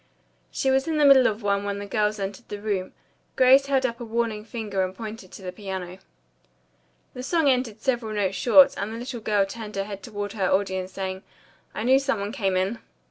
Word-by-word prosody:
She 265 - 0
was 265 +3 +2
in 320 -1 0
the 295 - +4
middle 270 -2 +7
of 215 +1 -3
one 200 0 +1
when 200 0 -3
the 205 - -5
girls 210 +1 0
entered 200 +3 -6
the 205 - -5
room. 200 -3 -2 0.4
Grace 265 +2 +6
held 270 -1 +2
up 235 -1 -2
a - - -5
warning 225 -2 -2
finger 215 -4 -3
and 185 0 -4
pointed 220 -4 -8
to 195 - -11
the 180 - -4
piano. 185 -2 -6 1.1
The 250 - -7
song 320 +3 +1
ended 250 -5 +1
several 240 -5 -1
notes 195 -2 0
short 260 +8 +6
and 210 - -3
the 225 - -5
little 240 0 -6
girl 210 -2 +2
turned 210 +1 -8
her 195 - -1
head 200 -1 -7
toward 205 -3 -5
her 195 -4 0
audience, 190 -1 0
saying, 190 0 -4 0.5
"I 215 - -3
knew 260 +3 +5
some 275 -6 -1
one 200 +1 -3
came 195 -7 0
in." 195 +5 -1
215 Hz, 215 wpm, -25 LUFS, 195-245 Hz, 1.1 s, middle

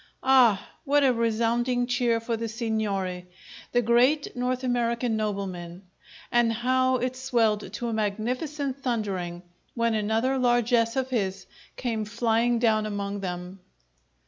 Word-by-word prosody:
Ah! 250 -6 +5 0.2
What 290 -1 +3
a 260 -2 +4
resounding 235 +2 +1
cheer 240 -1 +1
for 230 0 -2
the 230 0 -3
signore, 210 -5 -2 0.4
the 245 0 +2
great 250 +7 +3
North 250 +1 -1
American 235 -1 0
nobleman! 195 -4 -4 0.5
And 240 -1 +3
how 255 +3 +2
it 255 0 -1
swelled 230 -5 0
to 240 - -3
a 230 - -2
magnificent 255 +7 -2
thundering 195 -9 -3 0.3
when 230 -1 +1
another 220 +5 +1
largess 240 -2 +2
of 265 -1 -1
his 195 -5 -1 0.3
came 225 -4 -2
flying 230 +2 +1
down 220 -2 +2
among 200 -1 -3
them! 180 0 -6
230 Hz, 130 wpm, -26 LUFS, 210-250 Hz, 0.5 s, Ah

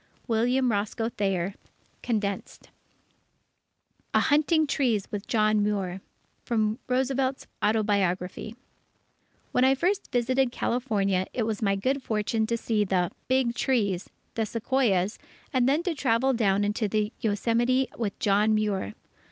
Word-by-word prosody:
William 245 +2 +2
Roscoe 215 +2 -1
Thayer 195 -4 -1 0.5
(Condensed) 205 -4 -3 1.4
A - - +6
HUNTING 310 +2 +3
TREES 245 -8 0
WITH 205 -1 -5
JOHN 215 -2 +2
MUIR 195 -3 -1 0.4
From 220 0 0
Roosevelt's 265 +1 0 0.2
Autobiography 205 -1 0 1.0
When 250 - +2
I 265 +1 +5
first 370 +8 -1
visited 255 +1 +1
California, 200 -8 0
it 240 - 0
was 220 -1 -2
my 200 -2 +2
good 265 +8 0
fortune 220 -1 -1
to 235 0 0
see 220 -2 0
the 185 -3 0 0.2
"big 255 -2 +2
trees," 210 -8 0 0.2
the 225 -1 -1
Sequoias, 220 -4 0 0.3
and 255 -1 +3
then 300 +5 +2
to 355 - -1
travel 265 -2 +1
down 205 -4 +2
into 210 +2 0
the 210 +1 -1
Yosemite 235 +5 +1
with 215 -4 -3
John 210 +2 +3
Muir. 200 - -1
220 Hz, 125 wpm, -27 LUFS, 205-255 Hz, 1.4 s, A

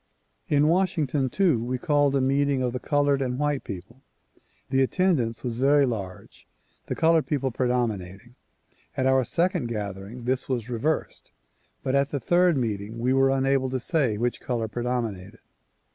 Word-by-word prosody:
In 145 0 +3
Washington 155 -6 +1
too, 165 - +2
we 125 +2 -2
called 145 -1 +2
a 135 - +2
meeting 135 0 +1
of 125 -1 -1
the 125 - -3
colored 145 0 +1
and 125 -1 -2
white 145 -1 -1
people. 100 +7 -9 0.7
The 135 0 +3
attendance 135 -6 +1
was 120 -2 -3
very 140 +1 +4
large, 100 -7 -6 0.4
the - - -2
colored 165 -1 +3
people 135 -3 -1
predom 125 -2 +1
inating. 95 +6 -12 0.6
At 130 - +1
our 130 0 +4
second 175 - 0
gathering 105 +1 -6
this 130 +2 -2
was 125 -2 -2
reversed 145 +7 -2 0.5
but 130 - -1
at 140 0 +2
the 140 - -2
third 175 +4 +3
meeting 110 -2 -3
we 125 +3 +1
were 135 0 +4
unable 135 0 +1
to 130 0 -2
say 130 - 0
which 120 +2 -2
color 115 -3 -2
predominated. 115 -4 -3
130 Hz, 160 wpm, -25 LUFS, 120-145 Hz, 0.7 s, very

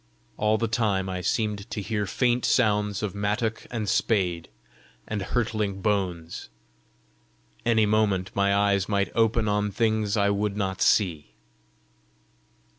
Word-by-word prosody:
All 105 +1 +2
the 115 - 0
time 105 -4 0
I 90 -1 -3
seemed 105 +2 -1
to - - -4
hear 105 0 -2
faint 120 +6 +1
sounds 105 -3 +1
of 105 - -2
mattock 105 +3 -2
and 110 -3 -3
spade 90 -6 0 0.6
and 105 -2 -3
hurtling 105 -2 -1
bones: 90 - -2 1.2
any 110 -2 +4
moment 105 -3 +1
my 100 0 +2
eyes 100 -1 +2
might 100 -1 0
open 115 0 +2
on 105 0 +1
things 110 0 0
I 100 0 +3
would 100 0 -1
not 95 -2 -2
see! 85 -8 +1
105 Hz, 130 wpm, -26 LUFS, 100-110 Hz, 1.2 s, any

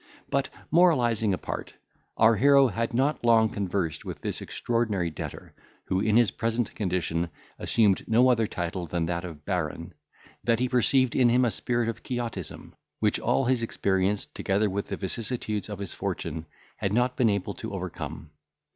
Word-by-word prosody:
But, - - +1 0.2
moralising 120 - +4
apart, 95 - -4 0.4
our 115 +1 +6
hero 140 +3 +6
had 115 +3 -2
not 135 +4 +1
long 115 -2 +5
conversed 95 -6 -2
with - - -6
this - - -3
extraordinary 110 -8 -1
debtor, 75 - -7 0.3
who 95 - 0
in 110 +2 +3
his 120 -6 +4
present 115 +2 -1
condition 90 -4 -1 0.3
assumed 105 -5 +2
no 120 +3 +5
other 115 -4 +3
title 85 -1 -4
than 85 +1 -1
that 85 +1 -2
of 80 -4 -9
Baron, 85 -1 -3 0.5
than 115 -1 +3
he 125 +2 +1
perceived 130 +1 +2
in 125 -2 +5
him 125 +1 +4
a 120 - +1
spirit 120 0 -1
of 115 - -4
Quixotism, 115 -9 -5 0.2
which - - +1
all 135 - +1
his 125 -1 +2
experience, 100 -2 0
together 100 +1 0
with 100 +1 -3
the - - -4
vicissitudes 110 +1 -3
of 105 - -5
his 100 -2 -5
fortune, 80 +1 -4 0.3
had 95 - -1
not 125 +2 +2
been 120 -3 +3
able 100 -3 -1
to - - -7
overcome. 75 - -6
110 Hz, 165 wpm, -27 LUFS, 95-120 Hz, 0.5 s, our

